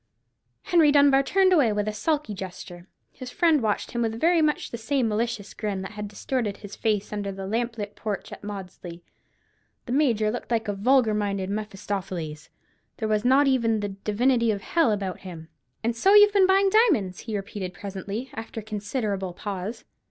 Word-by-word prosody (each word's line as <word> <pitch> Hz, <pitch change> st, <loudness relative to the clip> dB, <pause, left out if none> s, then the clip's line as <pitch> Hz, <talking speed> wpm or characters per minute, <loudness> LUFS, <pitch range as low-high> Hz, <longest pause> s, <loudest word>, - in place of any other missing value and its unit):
Henry 325 Hz, -4 st, +4 dB
Dunbar 280 Hz, -1 st, +5 dB
turned 375 Hz, +6 st, +3 dB
away 280 Hz, -10 st, +4 dB
with 210 Hz, 0 st, -1 dB
a 215 Hz, -, -1 dB
sulky 295 Hz, -2 st, -1 dB
gesture. 180 Hz, -2 st, -8 dB, 0.2 s
His 255 Hz, -, -9 dB
friend 320 Hz, +1 st, +3 dB
watched 215 Hz, -2 st, -1 dB
him 235 Hz, -, -2 dB
with 225 Hz, 0 st, -1 dB
very 335 Hz, +2 st, +4 dB
much 305 Hz, -1 st, 0 dB
the 235 Hz, -, -4 dB
same 260 Hz, +1 st, 0 dB
malicious 220 Hz, -1 st, -2 dB
grin 200 Hz, -3 st, -3 dB
that 195 Hz, -, -7 dB
had 210 Hz, -1 st, -6 dB
distorted 210 Hz, 0 st, -3 dB
his 205 Hz, -1 st, -10 dB
face 210 Hz, -2 st, -1 dB
under 200 Hz, -1 st, -3 dB
the 195 Hz, 0 st, -6 dB
lamp 230 Hz, +3 st, -2 dB
lit 205 Hz, -1 st, -5 dB
porch 210 Hz, -3 st, -5 dB
at -, -, -10 dB
Maudesley. 180 Hz, -4 st, -8 dB, 0.8 s
The -, -, -6 dB
Major 235 Hz, -7 st, +2 dB
looked 245 Hz, -, -6 dB
like 225 Hz, -2 st, 0 dB
a 205 Hz, -, 0 dB
vulgar 230 Hz, +2 st, +3 dB
minded 200 Hz, -2 st, -1 dB
Mephistopheles: 195 Hz, -6 st, -5 dB, 0.5 s
there 220 Hz, -, -2 dB
was 215 Hz, 0 st, +1 dB
not 265 Hz, +3 st, +5 dB
even 230 Hz, -5 st, +2 dB
the 205 Hz, -, -2 dB
"divinity 230 Hz, +5 st, +1 dB
of 205 Hz, -2 st, -1 dB
hell" 330 Hz, -8 st, +2 dB
about 195 Hz, -3 st, -3 dB
him. 170 Hz, -4 st, -10 dB, 0.3 s
"And 230 Hz, +1 st, 0 dB
so 385 Hz, -, +4 dB
you've 415 Hz, 0 st, +8 dB
been 390 Hz, -2 st, +5 dB
buying 390 Hz, 0 st, +4 dB
diamonds?" 315 Hz, -, +3 dB
he 220 Hz, -2 st, -4 dB
repeated 195 Hz, -2 st, -5 dB
presently, 200 Hz, +6 st, -6 dB
after 225 Hz, 0 st, -6 dB
a -, -, -16 dB
considerable 205 Hz, -3 st, -3 dB
pause. 200 Hz, +3 st, -5 dB
215 Hz, 185 wpm, -25 LUFS, 200-255 Hz, 0.8 s, you've